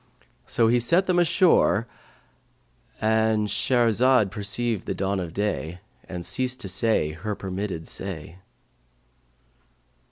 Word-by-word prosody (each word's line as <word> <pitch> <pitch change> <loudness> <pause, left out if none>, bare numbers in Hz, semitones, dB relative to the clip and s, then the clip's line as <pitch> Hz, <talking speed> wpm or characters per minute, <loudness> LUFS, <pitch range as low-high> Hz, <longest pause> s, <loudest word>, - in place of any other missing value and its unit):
So 115 -2 +2
he 120 +2 +3
set 170 +11 +2
them 180 -1 +2
ashore,"— 170 - +3 1.1
And 110 -1 +1
Shahrazad 120 0 +3
perceived 105 +1 -1
the - - -2
dawn 100 0 -1
of 85 -3 -5
day 90 -3 -3 0.3
and 90 -2 -6
ceased 130 0 0
to 100 - -4
say 95 -4 +1
her 100 +7 -5
permitted 95 -3 -5
say. 85 -3 -6
105 Hz, 115 wpm, -24 LUFS, 95-120 Hz, 1.1 s, he